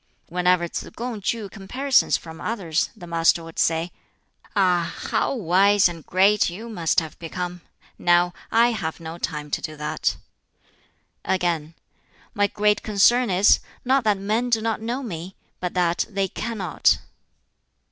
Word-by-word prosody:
Whenever 180 Hz, 0 st, +2 dB
Tsz -, -, -6 dB
kung 235 Hz, -2 st, -4 dB
drew 210 Hz, +1 st, -2 dB
comparisons 250 Hz, +8 st, +1 dB
from 160 Hz, -1 st, -11 dB
others, 185 Hz, -8 st, -1 dB
the 175 Hz, -, -11 dB
Master 165 Hz, 0 st, +2 dB
would 165 Hz, 0 st, -9 dB
say, 165 Hz, +1 st, +1 dB, 0.6 s
"Ah, 180 Hz, -4 st, +2 dB, 0.2 s
how -, -, +1 dB
wise 200 Hz, 0 st, +4 dB
and 170 Hz, -2 st, -7 dB
great 195 Hz, +3 st, +4 dB
you 210 Hz, +7 st, -8 dB
must 170 Hz, -7 st, +1 dB
have 160 Hz, -2 st, -8 dB
become! 175 Hz, +1 st, -5 dB, 0.4 s
Now 175 Hz, 0 st, +3 dB, 0.2 s
I 230 Hz, +2 st, +5 dB
have 175 Hz, -8 st, -4 dB
no 165 Hz, +1 st, -8 dB
time 150 Hz, -4 st, -4 dB
to -, -, -1 dB
do 155 Hz, -1 st, -6 dB
that." 150 Hz, 0 st, -1 dB, 1.1 s
Again, 170 Hz, -4 st, -1 dB, 0.6 s
"My 205 Hz, 0 st, +2 dB
great 210 Hz, 0 st, +1 dB
concern 225 Hz, +3 st, +3 dB
is, 190 Hz, +2 st, +5 dB, 0.3 s
not 265 Hz, +1 st, +3 dB
that 210 Hz, -2 st, +3 dB
men 215 Hz, +5 st, -1 dB
do 230 Hz, -2 st, +3 dB
not 220 Hz, 0 st, -2 dB
know 240 Hz, +4 st, -3 dB
me, 185 Hz, -4 st, -6 dB, 0.2 s
but 180 Hz, 0 st, -4 dB
that 175 Hz, -1 st, +1 dB
they 195 Hz, -2 st, -1 dB
cannot." 220 Hz, +2 st, 0 dB
185 Hz, 145 wpm, -23 LUFS, 170-215 Hz, 1.1 s, I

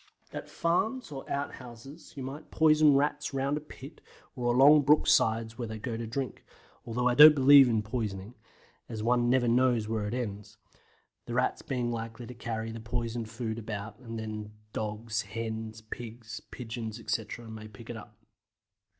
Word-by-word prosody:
At -, -, -6 dB
farms 220 Hz, +7 st, -1 dB
or 135 Hz, -2 st, -8 dB
out 140 Hz, +1 st, -2 dB
houses 130 Hz, +5 st, -12 dB
you 135 Hz, -, -4 dB
might 135 Hz, +4 st, -7 dB
poison 155 Hz, -2 st, +5 dB
Rats 145 Hz, 0 st, 0 dB
round 135 Hz, +2 st, 0 dB
a -, -, -2 dB
pit 150 Hz, 0 st, -12 dB, 0.3 s
or 120 Hz, -2 st, 0 dB
along 140 Hz, +5 st, +7 dB
brook 150 Hz, +2 st, +4 dB
sides 110 Hz, +1 st, +2 dB
where 120 Hz, -, -3 dB
they 110 Hz, 0 st, -6 dB
go 115 Hz, +1 st, -4 dB
to 115 Hz, 0 st, -4 dB
drink, 130 Hz, +3 st, -4 dB, 0.4 s
although 125 Hz, +2 st, 0 dB
I 125 Hz, -, +3 dB
don't 150 Hz, +4 st, +10 dB
believe 135 Hz, -1 st, +8 dB
in 110 Hz, -2 st, +1 dB
poisoning, 105 Hz, -2 st, -4 dB, 0.6 s
as 110 Hz, -2 st, -5 dB
one 120 Hz, +1 st, +2 dB
never 125 Hz, -1 st, +3 dB
knows 120 Hz, -2 st, +3 dB
where 110 Hz, -2 st, -2 dB
it 110 Hz, -, -3 dB
ends 105 Hz, -5 st, -5 dB, 0.7 s
the 120 Hz, -, -4 dB
Rats 125 Hz, -, +1 dB
being 125 Hz, -5 st, -2 dB
likely 115 Hz, +1 st, -5 dB
to 125 Hz, -, -9 dB
carry 115 Hz, -1 st, -4 dB
the 115 Hz, -, -7 dB
poisoned 115 Hz, 0 st, -3 dB
food 115 Hz, -1 st, -4 dB
about, 105 Hz, -1 st, -6 dB
and 115 Hz, -3 st, -7 dB
then 110 Hz, -1 st, -5 dB, 0.2 s
dogs, 110 Hz, +1 st, -2 dB
hens, 110 Hz, +1 st, -5 dB
pigs, 115 Hz, +1 st, -8 dB
pigeons, 115 Hz, -2 st, -6 dB
etc., 115 Hz, +1 st, -4 dB
may 110 Hz, -1 st, -8 dB
pick 110 Hz, +2 st, -13 dB
it -, -, -6 dB
up. 110 Hz, -, -11 dB
120 Hz, 175 wpm, -29 LUFS, 110-130 Hz, 0.7 s, don't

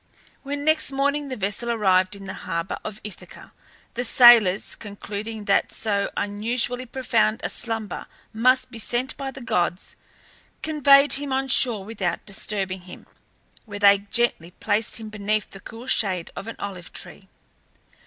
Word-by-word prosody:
When 285 Hz, +1 st, -3 dB
next 310 Hz, -2 st, +3 dB
morning 280 Hz, +1 st, 0 dB
the 260 Hz, -, -4 dB
vessel 205 Hz, +4 st, -2 dB
arrived 190 Hz, -4 st, +2 dB
in 200 Hz, 0 st, -10 dB
the -, -, -5 dB
harbour 170 Hz, +2 st, -4 dB
of 215 Hz, -1 st, -7 dB
Ithaca 210 Hz, -3 st, -11 dB, 0.4 s
the 245 Hz, -, -2 dB
sailors, 230 Hz, -6 st, +6 dB
concluding 210 Hz, +1 st, -7 dB
that 200 Hz, -, +2 dB
so 200 Hz, -2 st, -1 dB
unusually 235 Hz, +5 st, -1 dB
profound 230 Hz, -3 st, +1 dB
a -, -, -1 dB
slumber 225 Hz, -3 st, -4 dB, 0.3 s
must 255 Hz, +3 st, +3 dB
be 230 Hz, -, -7 dB
sent 245 Hz, +4 st, -1 dB
by 275 Hz, -1 st, -5 dB
the 270 Hz, 0 st, -10 dB
gods, 180 Hz, -5 st, -1 dB, 0.7 s
conveyed 290 Hz, -2 st, +5 dB
him 280 Hz, 0 st, -2 dB
on 265 Hz, 0 st, 0 dB
shore 230 Hz, -6 st, +4 dB
without 195 Hz, -6 st, -3 dB
disturbing 195 Hz, -2 st, -4 dB
him, 180 Hz, 0 st, -12 dB, 0.6 s
where 205 Hz, -3 st, -7 dB
they 200 Hz, -1 st, +6 dB
gently 235 Hz, -8 st, 0 dB
placed 210 Hz, +1 st, 0 dB
him 220 Hz, -1 st, -7 dB
beneath 210 Hz, 0 st, -2 dB
the 195 Hz, -, -10 dB
cool 225 Hz, +5 st, -10 dB
shade 190 Hz, -9 st, 0 dB
of 220 Hz, -, -7 dB
an 230 Hz, -, -6 dB
olive 185 Hz, -4 st, -7 dB
tree. -, -, -10 dB
220 Hz, 155 wpm, -24 LUFS, 200-255 Hz, 0.7 s, sailors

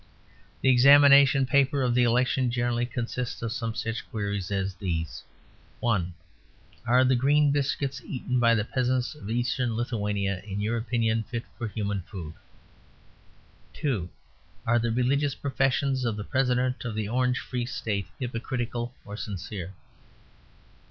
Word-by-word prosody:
The 130 Hz, -, +3 dB
examination 140 Hz, +1 st, +7 dB
paper 140 Hz, 0 st, +2 dB
of 125 Hz, -1 st, +1 dB
the 125 Hz, -, +3 dB
Election 125 Hz, +2 st, +2 dB
generally 120 Hz, 0 st, 0 dB
consists 120 Hz, 0 st, -4 dB
of 115 Hz, -, -2 dB
some 115 Hz, -3 st, -3 dB
such 115 Hz, 0 st, -3 dB
queries 100 Hz, -3 st, -3 dB
as 95 Hz, -1 st, -1 dB
these: 85 Hz, -5 st, -3 dB, 0.7 s
"I. 100 Hz, -7 st, +2 dB, 0.8 s
Are 125 Hz, +2 st, +5 dB
the 130 Hz, 0 st, +3 dB
green 145 Hz, +3 st, +3 dB
biscuits 140 Hz, -2 st, -1 dB
eaten 125 Hz, -1 st, -2 dB
by 115 Hz, -1 st, +5 dB
the 105 Hz, -2 st, 0 dB
peasants 125 Hz, +1 st, 0 dB
of 150 Hz, -9 st, -10 dB
Eastern 120 Hz, 0 st, 0 dB
Lithuania 105 Hz, -5 st, -1 dB
in 100 Hz, -1 st, -5 dB
your 110 Hz, +3 st, 0 dB
opinion 115 Hz, -1 st, 0 dB
fit 115 Hz, -1 st, -3 dB
for 120 Hz, -, -4 dB
human 105 Hz, -2 st, -2 dB
food? 85 Hz, -4 st, -8 dB, 1.5 s
II. 110 Hz, -, 0 dB, 0.6 s
Are 120 Hz, +1 st, +3 dB
the 120 Hz, 0 st, 0 dB
religious 135 Hz, +4 st, +1 dB
professions 135 Hz, -1 st, 0 dB
of 115 Hz, -3 st, 0 dB
the 105 Hz, -, -4 dB
President 125 Hz, +1 st, 0 dB
of 115 Hz, -3 st, -4 dB
the 110 Hz, -1 st, -2 dB
Orange 125 Hz, +2 st, +1 dB
Free 125 Hz, -2 st, -3 dB
State 105 Hz, -5 st, -3 dB
hypocritical 120 Hz, -1 st, -3 dB
or 105 Hz, -, -7 dB
sincere? 100 Hz, -3 st, -6 dB
120 Hz, 140 wpm, -27 LUFS, 105-130 Hz, 1.5 s, examination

